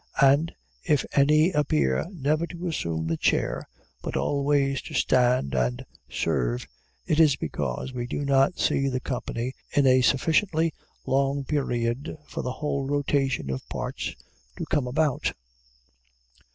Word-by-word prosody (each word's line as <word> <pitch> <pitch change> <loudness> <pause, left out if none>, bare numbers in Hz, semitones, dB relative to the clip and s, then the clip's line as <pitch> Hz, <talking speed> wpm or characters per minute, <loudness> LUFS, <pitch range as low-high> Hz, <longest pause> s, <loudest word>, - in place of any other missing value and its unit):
And 140 +4 +5 0.3
if 150 -5 +2
any 150 +5 +5
appear 75 - +1
never 155 -1 0
to 175 +1 -6
assume 85 - -2
the 80 0 -1
chair, - - 0 0.3
but - - -3
always 140 -1 +1
to - - -8
stand 125 - +2
and 60 -1 0 0.2
serve, - - -1 0.4
it 155 - +1
is 155 -4 +6
because 75 - -3
we 120 -1 -3
do 145 +3 -3
not 140 +4 +3
see 135 - +1
the 130 -1 -1
company 125 -1 -3 0.2
in 145 - +4
a 130 0 +5
sufficiently 160 +5 +2 0.3
long 135 +1 +1
period 130 0 -1
for - - -5
the 125 - -3
whole 140 -1 -2
rotation 140 - 0
of 65 - -5
parts - - -4 0.4
to - - -3
come 145 -5 0
about. 140 +1 0
135 Hz, 140 wpm, -26 LUFS, 120-150 Hz, 0.4 s, is